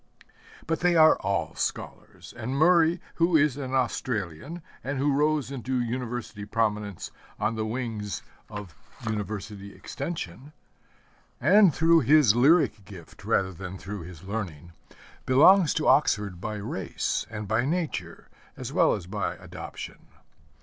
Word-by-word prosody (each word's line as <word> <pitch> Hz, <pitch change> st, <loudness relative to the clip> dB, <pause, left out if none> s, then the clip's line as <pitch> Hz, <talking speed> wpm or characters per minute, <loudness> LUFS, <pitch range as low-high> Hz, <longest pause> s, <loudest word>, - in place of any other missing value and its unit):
But 165 Hz, -1 st, -1 dB
they 175 Hz, 0 st, +3 dB
are 155 Hz, -1 st, +7 dB
all 100 Hz, 0 st, -1 dB
scholars, -, -, -5 dB
and 125 Hz, +4 st, -4 dB
Murray, 170 Hz, +2 st, +4 dB, 0.2 s
who 170 Hz, 0 st, +4 dB
is 150 Hz, -3 st, +3 dB
an 135 Hz, -2 st, -4 dB
Australian, 125 Hz, -, -2 dB, 0.2 s
and 135 Hz, +2 st, -3 dB
who 140 Hz, +1 st, +2 dB
rose 150 Hz, -1 st, +1 dB
into 130 Hz, -1 st, -2 dB
University 120 Hz, -3 st, -4 dB
prominence 105 Hz, -2 st, -2 dB, 0.3 s
on 115 Hz, -, 0 dB
the 110 Hz, -1 st, -2 dB
wings 110 Hz, -4 st, -4 dB, 0.3 s
of 105 Hz, -5 st, -8 dB, 0.3 s
University 105 Hz, -1 st, -5 dB
Extension, 140 Hz, -, -6 dB, 0.9 s
and 190 Hz, -, +6 dB
through 165 Hz, +3 st, +4 dB
his 145 Hz, -5 st, +5 dB
lyric 135 Hz, -, +4 dB
gift 95 Hz, -5 st, -13 dB
rather 95 Hz, -1 st, +1 dB
than 90 Hz, +2 st, -7 dB
through 100 Hz, +1 st, -7 dB
his 85 Hz, 0 st, -11 dB
learning, 95 Hz, -6 st, -5 dB, 0.6 s
belongs 160 Hz, +7 st, +6 dB
to 155 Hz, -, 0 dB
Oxford 100 Hz, -, +2 dB
by 110 Hz, 0 st, -4 dB
race 100 Hz, -3 st, -3 dB
and 105 Hz, -2 st, -6 dB
by 110 Hz, +3 st, +1 dB
nature, 165 Hz, +3 st, -3 dB, 0.3 s
as -, -, -6 dB
well -, -, +4 dB
as 95 Hz, -, -7 dB
by 100 Hz, +3 st, -3 dB
adoption. -, -, -9 dB
115 Hz, 135 wpm, -27 LUFS, 105-150 Hz, 0.9 s, are